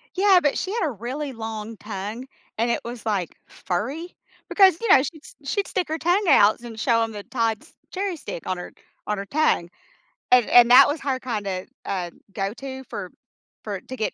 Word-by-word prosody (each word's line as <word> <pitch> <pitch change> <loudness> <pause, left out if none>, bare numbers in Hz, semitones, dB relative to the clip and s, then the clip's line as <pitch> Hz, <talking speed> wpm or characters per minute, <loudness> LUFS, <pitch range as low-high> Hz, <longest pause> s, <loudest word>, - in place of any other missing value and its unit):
Yeah, 385 0 +5
but 290 -3 +1
she 380 - -3
had 430 -6 0
a - - -2
really 260 +6 -5
long 220 -1 -6
tongue 210 +4 -6 0.3
and 235 +2 +1
it - - 0
was, 235 -1 -7
like, 200 -6 -1
furry 270 - -4 0.3
because, 380 -4 +5
you 465 - -2
know, 265 - +7
she'd 310 +1 -7
st - - -13
she'd 405 +4 -1
stick 370 - -1
her 315 - -1
tongue 355 +5 +1
outs 215 -4 +5
and 225 -2 -8
show 230 +1 +2
'em 225 - -3
the 205 -2 -7
Todd's 225 -3 -2 0.2
cherry 385 -1 -2
stick 225 - -7
on 185 - -1
her 180 - -8 0.4
on 210 - -1
her 200 - -4
tongue. 275 - +1 0.6
And 250 -2 +6
and 240 -1 +7
that 270 +2 +9
was 295 +2 -2
her 270 -2 -1
kind 225 -6 -4
of, 185 -1 -3 0.2
uh, 180 -3 -2 0.2
go 195 -1 -2
to 265 +1 -7
for 195 -6 -7 0.5
for 200 -3 -5
to 260 - -8
get 215 - -2
240 Hz, 210 wpm, -24 LUFS, 210-300 Hz, 0.6 s, that